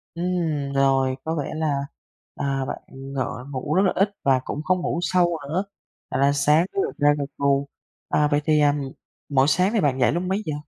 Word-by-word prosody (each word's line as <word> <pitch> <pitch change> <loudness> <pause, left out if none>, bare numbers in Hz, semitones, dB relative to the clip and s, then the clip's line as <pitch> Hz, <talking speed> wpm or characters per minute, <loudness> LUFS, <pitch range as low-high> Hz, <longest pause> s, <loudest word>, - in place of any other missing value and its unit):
Ừm, 165 -5 -1
rồi 135 -1 +2
có 160 +1 -2
vẻ 145 -1 -3
là, 150 -3 0 0.5
à, 135 -1 -1
bạn - - -4
ng 135 +1 -9 0.4
ngủ 140 +2 -3
rất 190 - +5
là 185 - +3
ít 195 +1 +3
và 135 -2 +4
cũng 150 - -4
không 185 +2 +1
ngủ 170 - -1
sâu 175 -2 +2
nữa, 180 +6 0 0.5
thành - - -1
ra 140 +1 +5
sáng 150 +4 +3
cứ - - -1
gật - - -5
gà 145 -2 +4
gật 140 - -2
gù, 140 0 +1 0.4
à, 150 - +3
vậy 145 - +2
thì, 155 -1 +3
à, 145 -1 +4 0.6
mỗi 135 -1 +3
sáng 185 +7 +2
thì 225 - +2
bạn 135 -3 +1
dậy 125 - +4
lúc 175 +3 -1
mấy 190 +3 -1
giờ? 155 - -2
150 Hz, 215 wpm, -23 LUFS, 140-175 Hz, 0.6 s, rất